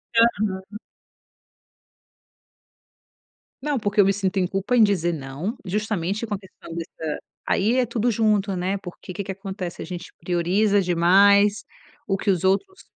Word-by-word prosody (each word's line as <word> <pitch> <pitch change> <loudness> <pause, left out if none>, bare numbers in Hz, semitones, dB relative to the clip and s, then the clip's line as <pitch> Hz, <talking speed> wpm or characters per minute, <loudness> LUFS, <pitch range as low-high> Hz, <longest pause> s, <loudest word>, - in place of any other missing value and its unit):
Aham. 210 -3 +1 2.8
Não, 290 -1 -1
porque 205 -1 -1
eu 200 - +8
me 195 - +3
sinto 195 -1 -1
em 185 - +3
culpa 195 +6 -1
em 230 - +7
dizer 180 -5 +2
não, 150 - -5
justamente 205 +1 -2
com 210 - -2
a - - -7
questão 190 -3 -13
dessa 160 -2 -5 0.3
aí 220 +5 +2
é 255 - +3
tudo 235 0 0
junto, 210 -3 +1
né, 185 +2 -1
porque 180 0 -9
que 200 - -4
que 195 - -5
acontece, 190 -2 -6
a - - -5
gente 175 +1 -8
prioriza 185 +4 +2
demais 200 +4 +4 0.4
o 195 - 0
que 200 - -2
os 185 -3 +2
outros 290 - 0
195 Hz, 150 wpm, -23 LUFS, 180-210 Hz, 2.8 s, eu